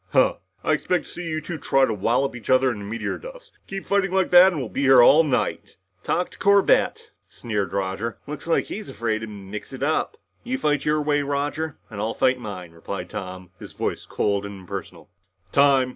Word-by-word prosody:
"Huh. - - +4 0.3
I - - +2
expected 180 - 0
to - - -13
see 175 -1 -6
you 155 -1 -2
two 160 +1 -6
try 135 -1 +3
to 115 - -2
wallop 125 +7 0
each 120 - -10
other 130 0 +4
into 105 -3 -6
meteor 110 +3 -4
dust! - - -11 0.2
Keep 195 0 -6
fighting 200 -1 +1
like 190 -1 +1
that 180 +2 +8
and 165 - -3
we'll 130 - -3
be 135 - -4
here 135 -3 +7
all 155 +6 +7
night!" 140 -5 -1 0.3
"Talk 180 - -1
to - - -15
Corbett," 200 -1 +3 0.2
sneered 105 -4 -3
Roger. 100 +4 -2
"Looks 150 +1 -7
like 165 - +2
he's 215 0 -7
afraid 110 -2 -2
to 110 - -6
mix 105 +3 -8
it 130 - -5
up!" 155 - 0 0.3
"You 255 +2 -2
fight 150 - 0
your 150 0 +2
way, 145 0 +2
Roger, 145 +2 -2
and 100 -2 -5
I'll 110 +1 -2
fight 130 0 +2
mine," 95 -7 -7
replied 90 +2 -7
Tom, 95 -3 -7
his - - -10
voice - - -3
cold 100 -1 0
and 100 -1 -8
impersonal. 90 - -8 0.4
"Time!" 140 -2 +4
135 Hz, 205 wpm, -24 LUFS, 105-160 Hz, 0.4 s, that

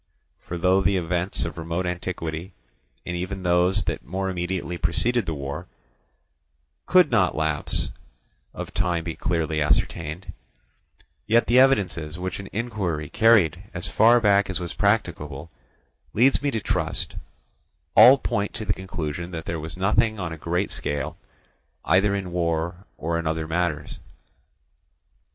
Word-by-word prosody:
For 85 - -6
though 95 +2 +3
the 95 0 +2
events 90 +1 -1
of - - -6
remote 85 +2 -2
antiquity, 85 -1 -4 0.5
and 90 - -3
even 95 +2 -4
those 90 +2 +3
that - - -3
more 95 +7 -3
immediately 90 0 -3
preceded 110 +9 0
the 80 - -2
war, 70 +5 -5 1.2
could 180 -4 +5
not 100 -6 +3
from - - -8
lapse 80 -1 0 0.6
of - - -7
time 90 -4 0
be 85 -1 -4
clearly 80 -3 -1
ascertained, 75 +3 -1 0.9
yet 115 +2 +4
the 125 +2 +4
evidences 90 - +2
which 90 +1 -4
an 100 - -8
inquiry 95 -10 -3
carried 100 -7 +4
as 85 - -2
far 120 +2 +5
back 100 -3 +3
as 95 - -2
was 85 -1 -5
practicable 85 -8 -1 0.6
leads 130 +6 +4
me 145 - +1
to 115 -5 -1
trust, - - -2 0.8
all 130 +2 +9
point 100 -6 -2
to 110 -2 -3
the - - +1
conclusion 85 -3 -5
that 80 -3 -6
there 85 - -3
was 80 +3 -7
nothing 105 +3 +2
on 85 -3 -3
a - - -5
great 90 +5 -1
scale, 75 +2 -3 0.7
either 100 +2 +3
in 95 -3 -4
war 85 +2 -2
or 85 +1 -1
in 85 - -3
other 80 0 -2
matters. 80 -3 -2
90 Hz, 145 wpm, -24 LUFS, 80-100 Hz, 1.2 s, all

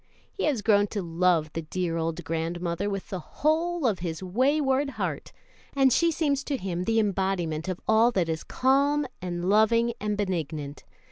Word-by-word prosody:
He 390 - -2
has 270 -9 0
grown 205 -1 +4
to 205 -1 -4
love 165 -2 +1
the 165 - -3
dear 170 +1 -3
old 165 +1 -2
grandmother 170 +4 -2
with 195 -1 -5
the 190 - -3
whole 320 - 0
of 215 -6 +1
his 170 0 -4
wayward 270 +7 +1
heart, - - -3 0.4
and 270 -2 +4
she 335 - +3
seems 285 -3 0
to 280 - -1
him 180 -4 -3
the 225 0 +2
embodiment 190 -6 -1
of 185 -2 -3
all 220 +2 +5
that 180 -5 +1
is 160 -1 -3
calm 280 +3 +2 0.2
and 175 -1 -3
loving 230 +3 +3
and 210 -1 -1
benignant. 155 -7 -3
195 Hz, 175 wpm, -27 LUFS, 170-260 Hz, 0.4 s, all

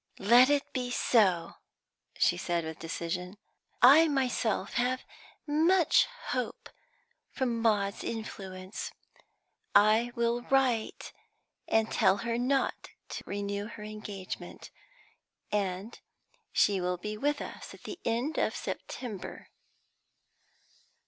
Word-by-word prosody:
"Let 240 +6 +6
it 290 -1 +1
be 250 -2 -2
so," 190 -9 +2 0.6
she - - +3
said 175 -2 -1
with 160 0 -6
decision. 175 +3 -4 0.5
"I 295 +6 +9
myself 250 -8 0
have 250 +2 0 0.4
much 325 +4 +4 0.2
hope - - -3 0.6
from 240 -4 -1
Maud's 205 -3 +1
influence. 190 -4 -6 0.8
I 220 +3 +5
will 235 0 +1
write 260 -5 +1 0.5
and 225 0 +2
tell 190 - +4
her 235 0 0
not 265 +2 0 0.2
to - - -6
renew 200 0 -3
her 215 -1 -9
engagement, 210 -3 -7 0.8
and 200 +1 -2 0.5
she 200 -3 +3
will 180 0 -1
be 210 +4 -5
with 290 +6 0
us - - -8
at - - -19
the 365 - -7
end 240 +7 -1
of - - 0
September." 215 -7 -6
220 Hz, 110 wpm, -30 LUFS, 195-250 Hz, 0.8 s, I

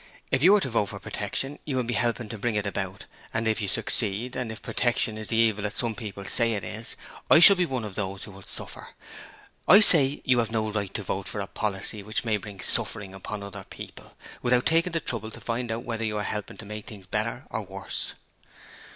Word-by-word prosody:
If - - +2
you 195 +6 +7
vote 120 - 0
for - - -7
Protection 140 +2 -4
you 140 - -3
will 130 - +1
be 120 +1 -3
helping 115 +1 -1
to 115 - -6
bring 115 +1 -1
it 105 -1 -1
about, 95 -1 -4 0.3
and 115 0 0
if 110 0 +1
you 105 - -1
succeed, 115 +3 0
and 125 -3 -3
if 110 - -9
Protection 120 -2 0
is 110 -1 -6
the - - -1
evil 110 -2 +3
that 105 0 -3
some 120 -2 -1
people 105 -3 -7
say 115 +2 +3
is 100 - -4
is, 110 +2 0 0.3
I - - +8
shall 200 +4 +9
be 180 -2 +1
one 130 -5 -3
of 105 -3 -6
those 95 -1 -4
who - - -8
will 95 0 -12
suffer. - - -6 0.8
I 200 - +9
say 145 -9 +7
you 125 -2 +3
have 115 - 0
no 110 -1 -1
right 105 -3 -3
to - - -2
vote - - -3
for - - -5
a - - -2
policy 105 0 -4
which 110 +4 -4
may 110 -2 +1
bring 100 -1 -9
suffering 95 -2 +4
upon 100 +2 -6
other 100 -1 -9
people, - - -11 0.2
without 125 0 +2
taking 165 +2 +3
the 165 - +1
trouble 110 -5 -3
to - - -11
find 120 0 -3
out 115 +1 -3
whether 115 -1 -4
you 105 -1 -2
are 105 - -2
helping 105 0 -5
to 110 - -9
make 105 0 -8
things 100 -4 -10
better 110 +7 -3
or 110 - -2
worse.' 95 -1 -4
110 Hz, 230 wpm, -26 LUFS, 105-120 Hz, 0.8 s, shall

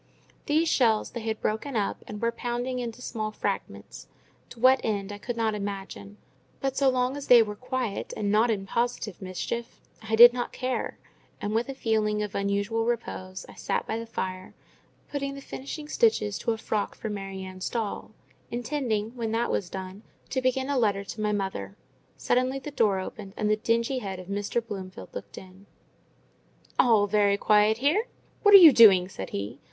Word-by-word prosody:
These 315 +3 +2
shells 225 -8 +2
they 240 - -5
had 220 -1 -3
broken 230 +5 -2
up 205 -2 -1
and 210 - -7
were 230 +1 +1
pounding 245 +2 -3
into 240 0 -6
small 215 -2 -3
fragments, - - -5 0.4
to 235 - -13
what 260 +2 +5
end 205 -2 -2
I 205 - -7
could 235 +2 -5
not 225 -1 +1
imagine; 195 - -6 0.4
but 270 -1 -2
so 275 -1 +3
long 255 +1 0
as 285 -1 -7
they 240 -2 +8
were 210 -1 -6
quiet 250 -2 -3
and 205 -1 -1
not 220 +3 +4
in 200 -3 -1
positive 230 -2 -2
mischief, 190 +5 -5 0.2
I 220 0 -1
did 240 +2 +10
not 245 -1 -3
care; 255 0 -3 0.4
and, 205 - -3
with 230 +4 0
a 270 - -4
feeling 215 -3 0
of 210 - -5
unusual 200 +3 0
repose, 185 -5 -4
I - - -12
sat - - -2
by 225 - -3
the 230 - -7
fire, 185 -4 -5 0.5
putting 275 -1 -4
the - - -7
finishing 280 +2 -7
stitches 300 - +1
to 230 - 0
a 225 - -2
frock 215 -2 -2
for 220 - -5
Mary 195 -2 -5
Ann's 185 0 -5
doll; 225 -4 -3 0.4
intending, 235 -4 -2
when 230 -3 -3
that 235 +1 0
was 180 - -1
done, 190 +1 -7 0.3
to 260 - 0
begin 255 +1 0
a 280 -2 +1
letter 200 -4 +1
to 215 +2 -7
my 210 0 +1
mother. 190 - -3 0.4
Suddenly 255 +2 +1
the 270 +2 -7
door 220 -8 +2
opened, 195 +1 -7
and 210 0 +1
the - - +4
dingy 230 +4 0
head 195 -4 -5
of 185 0 -10
Mr. 205 +3 -2
Bloomfield 190 -4 -8
looked - - -8
in. 190 +1 -13 1.1
"All 220 -4 +5
very 205 -1 +3
quiet 210 +1 +4
here! 310 - +1 0.3
What 410 -1 +8
are - - +15
you 330 -6 +10
doing?" 195 -7 +7
said 95 - -7
he. 100 +6 -5
220 Hz, 190 wpm, -27 LUFS, 200-245 Hz, 1.1 s, are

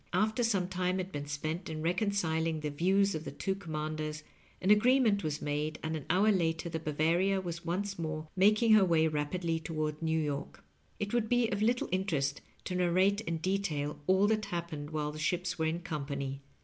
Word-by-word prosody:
After 220 +3 +2
some 200 -6 +1
time 185 0 -1
had 185 0 -3
been 145 -2 -5
spent 155 +5 -3
in 155 -1 -4
reconciling 165 -4 0
the 150 -1 -2
views 195 +6 +2
of 155 - -4
the - - -5
two 195 - -2
command 155 -4 -4
ers, 155 0 -4 0.4
an 190 - +2
agreement 220 -1 +4
was 150 -1 -3
made, 150 +1 -2
and 160 0 -2
an 150 - -5
honr 200 +4 +4
later 165 -1 0
the 165 -1 -3
Ba^oaria 165 +6 +1
was 170 -1 -5
once 195 +3 -2
more 155 -1 -3
making 215 +4 +4
Jier 215 -2 +8
way 160 -2 +4
rapidly 160 +2 -1
toward 155 -1 -3
New 160 0 +1
York. 145 -2 -4 0.4
It 205 +1 -3
would 230 -2 +1
be 245 -2 +3
of 200 - -1
little 240 +3 +2
interest 160 -7 0 0.2
to - - -4
narrate 185 +3 +2
in 165 -6 -2
detail 155 -5 -1
all 190 +2 +4
that 215 0 +1
happened 170 -5 -4
while 150 -1 -2
the 155 - -8
ships 175 +2 -1
were 160 - +1
in 165 +2 -2
company. 140 -3 -4
170 Hz, 195 wpm, -31 LUFS, 155-195 Hz, 0.4 s, Jier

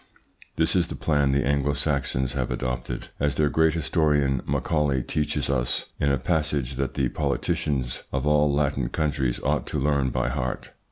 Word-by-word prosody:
This 80 +2 +1
is 90 -3 +3
the - - -6
plan 70 -3 +2
the 70 +1 +1
Anglo 70 0 +1
Saxons 70 -3 -1
have 65 -3 -1
adopted, 60 -1 -3
as 70 0 +1
their 75 -1 +2
great 80 +2 +3
historian, 75 -4 +2
Macaulay, 75 -5 +1
teaches 75 +4 -1
us - - 0
in 70 - +2
a 70 - +2
passage 75 -2 -1
that 70 -1 -2
the 65 - +1
politicians 65 -5 -1
of 65 +1 -1
all 75 0 +4
Latin 70 -3 0
countries 70 -6 -1
ought - - 0
to 75 - -2
learn 70 -1 +2
by 60 - 0
heart. 65 -1 -3
70 Hz, 170 wpm, -25 LUFS, 65-75 Hz, -, all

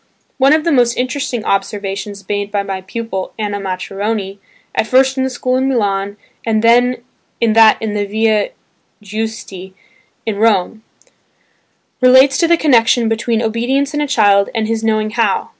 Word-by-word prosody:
One 270 +2 +4
of 310 0 +2
the 335 - 0
most 245 -4 +2
interesting 255 -2 -3
observations 200 0 -3
made 205 0 -3
by 200 -1 -1
my 195 -1 -5
pupil 190 0 -5
Anna 205 -2 -3
Maccheroni 195 +1 -4 0.3
(at 220 - -1
first 265 +2 +3
in 265 - -1
the 265 - -1
school 255 0 -1
in 265 +1 0
Milan 200 -4 -1 0.3
and 220 -1 0
then 240 +1 +3 0.4
in 230 -2 +2
that 225 -1 +6
in 220 -2 -3
the 205 -1 -2
Via 220 - +1 0.5
Guisti 205 -3 -6 0.5
in 220 -2 -2
Rome), 215 -1 +1 1.2
relates 260 +2 +5
to 335 - +3
the 340 0 +4
connection 240 -6 +3
between 225 +1 -1
obedience 250 +6 -1
in 295 - -1
a 295 - -1
child 200 -5 +3
and 220 -1 -1
his 225 0 -2
"knowing 215 -1 0
how." 225 -4 0
225 Hz, 160 wpm, -16 LUFS, 205-250 Hz, 1.2 s, that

